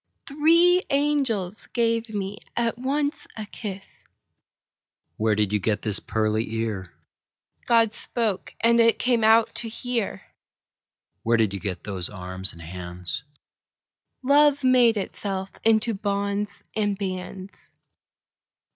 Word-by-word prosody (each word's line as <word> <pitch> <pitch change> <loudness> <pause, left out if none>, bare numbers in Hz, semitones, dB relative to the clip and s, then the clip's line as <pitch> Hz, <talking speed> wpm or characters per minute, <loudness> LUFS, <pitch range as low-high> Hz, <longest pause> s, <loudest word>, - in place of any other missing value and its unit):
Three 335 +5 +4
angels 270 -9 0
gave 230 -1 +1
me 205 -1 -4 0.2
at 235 -1 +1
once 285 +3 -1
a 215 - -4
kiss. 200 -2 -8 1.1
Where 110 0 +2
did 105 -1 0
you 105 - +2
get 105 +1 -1
this 105 -2 0
pearly 110 +1 -1
ear? 105 -6 -3 0.7
God 230 -2 +4
spoke, 225 -6 -3
and 235 +1 +4
it 230 -1 +5
came 240 -2 +1
out 225 +1 +5
to 230 0 -2
hear. 235 -1 -3 1.0
Where 115 0 +2
did 110 -3 +2
you 100 - -3
get 95 -3 -5
those 95 -4 -3
arms 95 0 -2
and 85 - -12
hands? 90 +5 -5 1.0
Love 285 +1 +4
made 250 -3 +5
itself 195 -1 -4
into 225 +1 +3
bonds 200 0 -2
and 205 -2 0
bands. 185 0 -6
205 Hz, 120 wpm, -25 LUFS, -, 1.1 s, it